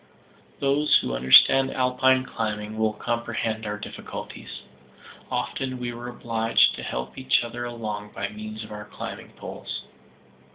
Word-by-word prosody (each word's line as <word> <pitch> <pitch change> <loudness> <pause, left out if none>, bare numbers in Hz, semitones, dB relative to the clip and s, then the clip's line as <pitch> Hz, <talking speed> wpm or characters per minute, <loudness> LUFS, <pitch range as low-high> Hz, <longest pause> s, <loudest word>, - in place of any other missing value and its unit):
Those 140 +2 +4
who 60 - -2
understand 65 - +7
Alpine 130 0 +3
climbing 110 -3 -3
will 110 -1 +2
comprehend 115 -1 -2
our 105 0 -3
difficulties. - - -8 0.7
Often 130 -1 -2
we 120 -1 -4
were 120 +1 -7
obliged 115 -2 +3
to - - -7
help 60 +1 -5
each 130 -2 +3
other 120 +1 -5
along 105 -3 -5
by - - -3
means 110 +1 -7
of 110 - -11
our 105 0 -7
climbing - - -8
poles. - - -6
115 Hz, 135 wpm, -25 LUFS, 105-125 Hz, 0.7 s, understand